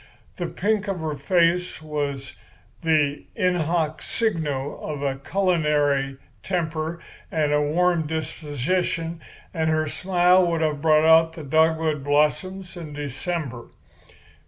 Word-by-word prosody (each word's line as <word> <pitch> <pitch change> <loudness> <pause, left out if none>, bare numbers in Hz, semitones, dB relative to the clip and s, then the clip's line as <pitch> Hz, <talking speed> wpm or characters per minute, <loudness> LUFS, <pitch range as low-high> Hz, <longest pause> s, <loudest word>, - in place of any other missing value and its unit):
The 175 - -2
pink 210 +3 -1
of 195 -3 -2
her 155 -1 -2
face 175 +4 +1
was 145 -3 -4 0.5
the 150 -3 +1
in 180 0 +2
hoc 160 -2 -1
signo 150 - -2
of 145 -2 -4
a 135 -1 -1
culinary 150 -6 +1 0.2
temper 165 -2 -2 0.3
and 150 -2 +1
a 150 - +3
warm 165 +2 +2
disposition, 165 +2 -2 0.3
and 160 -2 0
her 155 0 +1
smile 180 +3 +3
would 165 -1 0
have 150 -2 0
brought 155 0 +4
out 160 0 +6
the 160 - -8
dogwood 160 0 +2
blossoms 180 +6 0
in 160 -4 -8
December. 145 -2 -4
160 Hz, 125 wpm, -24 LUFS, 150-175 Hz, 0.5 s, out